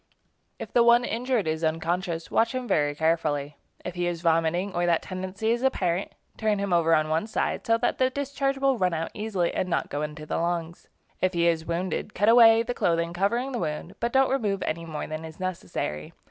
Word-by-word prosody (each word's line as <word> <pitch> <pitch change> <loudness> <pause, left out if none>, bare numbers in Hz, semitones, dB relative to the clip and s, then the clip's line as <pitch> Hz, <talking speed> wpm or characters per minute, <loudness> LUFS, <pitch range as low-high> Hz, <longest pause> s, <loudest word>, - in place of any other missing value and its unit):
If - - -8
the 240 - +5
one 235 +1 +5
injured 240 -4 -1
is 155 +1 -2
unconscious, 165 +1 -2
watch 230 +2 +2
him 255 -1 -3
very 145 -5 +1
carefully. 150 -2 0 0.3
If 180 - -4
he 175 0 -1
is 170 -1 -3
vomiting, 165 +3 +1
or 175 0 0
that 170 -1 +2
tendency 190 +4 -3
is 240 +1 0
apparent, 190 -8 0 0.2
turn 215 -2 +1
him 200 -2 -1
over 165 -1 +4
on 155 0 +1
one 160 +6 0
side 220 - -2
so 230 0 +4
that 245 - -1
the 255 0 +3
discharge 275 0 -2
will 270 -3 +1
run 180 -2 +1
out 165 0 -3
easily 205 -5 -1
and 185 - -1
not - - -1
go 145 - -2
into 150 0 -5
the - - -2
lungs. 170 0 -3 0.3
If 185 -1 +1
he 170 0 +2
is 165 -1 +1
wounded, 180 +4 -3
cut 205 +4 +3
away 230 -1 +7
the 245 +1 -3
clothing 170 -4 0
covering 235 +9 0
the 245 - -3
wound, 155 +2 -4
but 235 +1 -1
don't 265 +1 +3
remove 210 -8 0
any 165 +1 -3
more 155 -2 -5
than 155 +1 -6
is 160 +1 -10
necessary. 90 - -4
180 Hz, 215 wpm, -26 LUFS, 165-225 Hz, 0.3 s, away